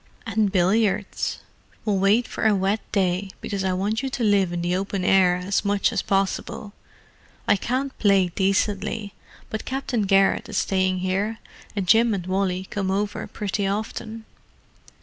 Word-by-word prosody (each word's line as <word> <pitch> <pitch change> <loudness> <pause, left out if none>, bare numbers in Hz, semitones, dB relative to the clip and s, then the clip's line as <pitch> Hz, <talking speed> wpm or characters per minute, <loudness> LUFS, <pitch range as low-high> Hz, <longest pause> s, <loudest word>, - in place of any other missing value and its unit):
"And 220 -2 +1
billiards? 200 +2 +1 0.4
We'll 205 -3 +1
wait 205 +5 +3
for - - 0
a 215 - +4
wet 195 +3 +1
day, 190 0 0
because 200 -2 -3
I 190 -1 +1
want 205 +5 -1
you 270 - -2
to 255 -2 -3
live 200 -4 +3
in 175 0 -3
the 175 +1 0
open 195 0 -2
air 185 -2 +5
as 180 +3 -1
much 200 -1 +1
as - - 0
possible. 195 +1 -2 0.7
I - - +5
can't 260 +6 -2
play 195 -3 +4
decently, 200 +2 -1 0.4
but 220 - -3
Captain 255 -5 -2
Garrett 195 0 +3
is - - -3
staying 185 -1 +1
here, 195 +4 -1 0.4
and 195 -3 -2
Jim 225 +2 +5
and 180 -3 -5
Wally 185 0 -1
come 195 -2 -2
over 205 +2 -2
pretty 200 -1 -2
often." 220 +2 -4
200 Hz, 160 wpm, -24 LUFS, 190-215 Hz, 0.7 s, air